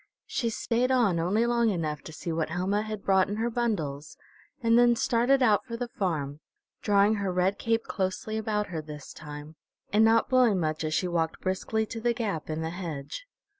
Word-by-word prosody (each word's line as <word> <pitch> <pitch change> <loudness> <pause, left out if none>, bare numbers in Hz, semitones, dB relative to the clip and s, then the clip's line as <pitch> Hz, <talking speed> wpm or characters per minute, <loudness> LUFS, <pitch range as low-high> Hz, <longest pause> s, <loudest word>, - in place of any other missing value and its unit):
She 235 - -1
stayed 235 +2 0
on 230 -10 +3
only 200 +8 +2
long 235 -1 +2
enough 155 -6 -2
to - - -8
see 165 +2 -5
what 160 -1 -1
Helma 185 +5 0
had 215 -2 -5
brought 190 -1 +3
in 205 - -2
her 230 +2 -1
bundles, 165 -12 -2 0.5
and 230 0 +4
then 240 0 +6
started 245 +4 +2
out 215 -4 +4
for 235 -3 -6
the 245 0 -4
farm, 150 -9 -2 0.4
drawing 205 0 +4
her 200 -2 -1
red 185 +2 +1
cape 230 0 +1
closely 190 +2 -3
about 210 -1 -1
her 165 -3 -3
this 150 -2 -9
time, 150 +1 -9 0.4
and 215 +1 +5
not 225 0 +4
blowing 250 -7 +4
much 155 -1 -1
as 155 0 -1
she 180 - +1
walked 165 -2 -1
briskly 205 +4 -1
to 225 +1 -7
the 240 +1 +2
gap 205 - -3
in 155 +1 -2
the 160 - -3
hedge. 170 - -6
200 Hz, 200 wpm, -28 LUFS, 160-230 Hz, 0.5 s, then